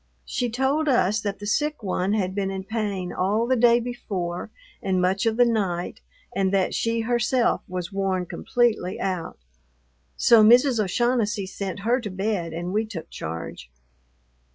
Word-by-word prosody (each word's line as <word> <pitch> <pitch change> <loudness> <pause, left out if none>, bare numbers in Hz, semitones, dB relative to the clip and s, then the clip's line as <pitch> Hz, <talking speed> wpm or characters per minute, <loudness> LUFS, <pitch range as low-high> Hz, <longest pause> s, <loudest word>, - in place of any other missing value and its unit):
She 245 - -2
told 270 +6 +1
us 215 -4 +2
that 205 -1 -3
the 205 - -8
sick 295 +5 -1
one 190 0 0
had 190 -3 0
been 195 -1 -1
in 190 0 -4
pain 200 -4 -3
all 205 +5 +1
the 260 +2 +2
day 235 0 +5
before 195 -8 -4 0.3
and 185 -1 0
much 190 +4 +1
of 225 0 +1
the 245 - +6
night, 195 -7 -1 0.3
and 190 -1 +1
that 195 -2 +1
she 230 0 0
herself 240 +1 +1
was 180 -1 -5
worn 190 -2 0
completely 225 -2 0
out. 185 -3 -3 0.8
So 230 -2 +6
Mrs. 240 +1 +5
O'Shaughnessy 210 0 0
sent 195 +1 -5
her 240 +5 +1
to 215 - -5
bed 190 -3 -2
and 175 +3 -4
we 215 +2 +2
took 180 -7 -8
charge. 80 -6 -6
205 Hz, 160 wpm, -24 LUFS, 185-235 Hz, 0.8 s, the